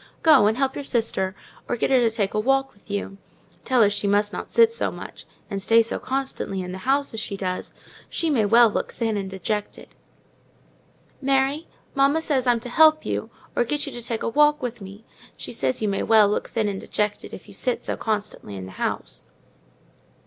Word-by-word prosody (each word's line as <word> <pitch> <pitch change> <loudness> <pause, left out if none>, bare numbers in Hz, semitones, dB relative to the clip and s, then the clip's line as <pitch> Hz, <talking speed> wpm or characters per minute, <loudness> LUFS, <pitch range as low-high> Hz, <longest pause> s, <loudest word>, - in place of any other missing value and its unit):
Go 290 -10 +7
and 220 +2 +1
help 270 0 +1
your 285 - -5
sister, 220 -7 -1 0.3
or 245 - 0
get 235 - 0
her 260 - +6
to 235 -2 +3
take 215 -3 -1
a 215 - +1
walk 270 +4 +1
with 200 - -27
you—tell 200 +4 -2
her 205 - +5
she 205 0 -1
must 205 +1 +2
not - - -5
sit 460 -1 +5
so 465 - -1
much, - - -10 0.2
and 200 -2 -4
stay 225 +4 +5
so 225 - -3
constantly 265 -7 -3
in 180 - -6
the 190 - -6
house 280 -1 +2
as 225 - -3
she 210 -2 -4
does—she 195 - -4
may 240 -7 +3
well 235 +3 +6
look 210 - -3
thin 225 -2 -1
and 195 -2 -3
dejected." 200 +2 -4 1.3
"Mary, 275 +3 +1 0.3
mamma 275 +3 +3
says 265 -5 0
I'm 240 -1 +4
to 245 - -6
help 310 +3 +5
you; - - -3 0.3
or - - +3
get 295 +5 -1
you 280 - -6
to 240 - -5
take 230 -1 -3
a - - 0
walk 295 +4 +4
with 240 -3 -4
me; 200 +3 -11 0.3
she - - -7
says 135 - -1
you - - +2
may 195 -1 0
well 220 -2 +5
look 205 - -1
thin 220 -3 0
and 195 -1 -3
dejected, 210 0 -2
if - - -10
you 200 - -13
sit 250 +5 -2
so - - -2
constantly 210 - -3
in 95 -1 -6
the 95 - -10
house." - - -2
225 Hz, 205 wpm, -24 LUFS, 205-270 Hz, 1.3 s, Go